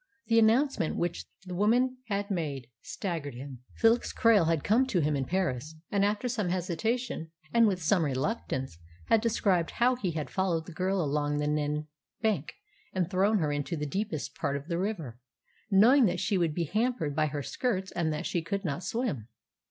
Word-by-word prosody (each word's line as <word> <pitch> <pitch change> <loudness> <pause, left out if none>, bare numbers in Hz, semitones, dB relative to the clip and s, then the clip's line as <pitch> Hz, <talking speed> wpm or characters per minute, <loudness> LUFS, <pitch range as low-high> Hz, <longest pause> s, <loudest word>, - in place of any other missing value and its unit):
The 230 -1 +4
announcement 230 - +3
which 175 0 -2 0.2
the 180 - -6
woman 245 +7 +2
had 200 -1 -2
made 145 -8 -2 0.2
staggered 170 -7 -4
him. 130 0 -8 0.2
Felix 230 +1 +3
Krail 215 -7 +4
had 165 -3 +1
come 245 +5 +3
to 195 -8 +1
him 150 -1 +1
in 135 -1 -1
Paris, 160 -4 -2 0.2
and 200 -1 +2
after 210 +4 +1
some 220 -7 -1
hesitation, 185 +2 -2 0.2
and 230 -1 +6
with 185 -4 -1
some 170 +2 +3
reluctance, 135 - -2 0.3
had 225 - +5
described 200 -7 +1
how 250 +2 +2
he 190 -9 -2
had 150 -4 -4
followed 175 -4 0
the 175 - -9
girl 185 +1 0
along 145 0 0
the 150 - 0
Nene 150 0 0 0.3
bank 210 -10 -1 0.4
and 185 -2 -1
thrown 200 +3 +3
her 155 -5 0
into 145 +4 -2
the 150 - -2
deepest 190 0 -3
part 140 - -1
of 140 +5 -10
the 170 0 -1
river, 165 - -3 0.5
knowing 230 +7 +6
that 175 -3 0
she 200 - 0
would 170 -4 +1
be 170 - 0
hampered 190 - -1
by 155 0 +2
her 145 -1 -4
skirts 190 - -2
and 165 -3 0
that 150 0 -3
she 175 - 0
could 195 +4 -3
not 160 +3 -2
swim. 200 - -2
180 Hz, 190 wpm, -29 LUFS, 150-215 Hz, 0.5 s, and